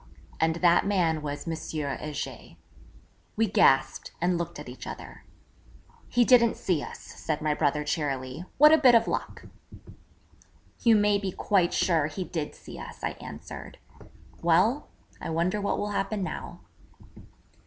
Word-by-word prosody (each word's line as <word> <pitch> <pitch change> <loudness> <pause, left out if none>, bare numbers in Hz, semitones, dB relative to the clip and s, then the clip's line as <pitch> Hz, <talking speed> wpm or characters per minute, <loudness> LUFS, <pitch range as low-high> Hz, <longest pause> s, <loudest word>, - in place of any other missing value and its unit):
And 160 0 +2
that 175 0 +5
man 175 -6 +1
was 145 +2 -5
M. 165 - -1 0.2
Heger. 150 -1 -5 0.8
We 225 - +2
gasped, 135 -9 +3
and 180 +1 +1
looked 170 -1 -4
at 150 - -9
each 125 +1 -9
other. - - -9 0.8
'He 240 0 +3
didn't 235 -2 +5
see 175 -6 0
us,' - - -7
said 155 -2 -5
my 155 -1 0
brother 150 0 0
cheerily. 140 -1 -3
'What 300 +2 +8
a 315 - +6
bit 255 -4 +7
of 230 0 +4
luck!' - - -4 1.4
'You 230 -2 +5
may 205 -1 +3
be 195 -2 -3
quite 180 -2 +1
sure 160 -5 +2
he 155 +5 -4
did 160 -4 -5
see - - -11
us,' - - -10
I - - 0
answered. - - -9 0.6
'Well, 185 - +3 0.3
I - - -4
wonder 175 +5 0
what 200 - 0
will 205 0 -2
happen 200 0 -1
now?' - - -6
175 Hz, 150 wpm, -27 LUFS, 150-205 Hz, 1.4 s, What